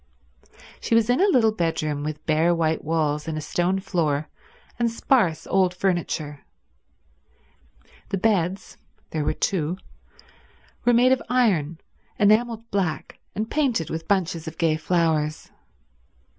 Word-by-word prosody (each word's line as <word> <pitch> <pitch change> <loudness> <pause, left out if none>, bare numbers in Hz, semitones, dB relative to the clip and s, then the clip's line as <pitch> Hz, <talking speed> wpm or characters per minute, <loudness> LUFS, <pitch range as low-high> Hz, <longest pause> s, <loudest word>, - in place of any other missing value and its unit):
She 230 - 0
was 230 +1 +3
in 250 - +2
a 400 - +5
little 230 - +4
bedroom 160 -6 -1
with 150 0 -5
bare 165 +2 +3
white 160 -1 0
walls 150 -1 -1
and 160 -1 -3
a - - -2
stone 175 +5 0
floor 155 -6 -1 0.5
and 235 -1 +2
sparse 225 - +1
old 185 -2 +2
furniture. 170 -6 -2 1.7
The 195 - -1
beds—there 185 -5 -2
were 150 - -1
two—were 175 -2 -1 1.2
made 245 +2 +5
of 260 -2 +2
iron, 190 - +2 0.4
enameled 225 +2 +2
black 180 -8 -2 0.2
and 215 +2 -2
painted 250 - 0
with 160 0 -5
bunches 180 -5 0
of 160 +1 -7
gay 165 -2 +2
flowers. 160 -2 0
175 Hz, 125 wpm, -24 LUFS, 155-215 Hz, 1.7 s, a